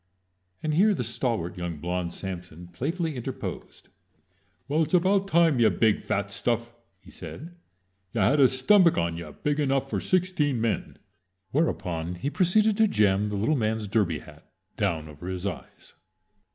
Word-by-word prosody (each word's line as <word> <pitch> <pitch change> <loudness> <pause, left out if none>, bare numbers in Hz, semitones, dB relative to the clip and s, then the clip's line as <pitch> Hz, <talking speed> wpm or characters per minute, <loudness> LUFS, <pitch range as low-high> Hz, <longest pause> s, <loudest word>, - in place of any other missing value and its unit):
And 155 -1 0
here 200 +6 +4
the 125 - -2
stalwart 115 -7 -2
young 85 -2 -4
blond 90 +2 -3
Samson 90 -2 -7
playfully 155 - -3
interposed. 120 - -7 0.8
"Well, 150 +3 +1
it 160 - +2
was 155 - -13
about 190 +2 +3
time, 165 -7 +3
ya 115 - +6
big, 110 -2 +2
fat - - -2
stuff!" 120 0 -2 0.3
he - - -16
said. 110 - -9 0.6
"Ya 105 -1 +2
had 145 - +2
a 135 - +8
stummick 170 +8 +4
on 85 0 0
ya 85 -3 -7
big 145 - -2
enough 135 -1 0
for - - 0
sixteen 180 -8 +1
men." 115 -1 -2 0.5
Whereupon 90 - -1
he 135 +11 -3
proceeded 205 +5 +3
to 220 -1 +5
jam 105 - +2
the 105 - -3
little 110 +10 +1
man's 110 -3 -1
derby 95 -6 +1
hat - - -15 0.2
down 80 -2 -1
over 75 +3 -10
his 95 0 -4
eyes. 100 -3 -7
120 Hz, 165 wpm, -26 LUFS, -, 0.8 s, a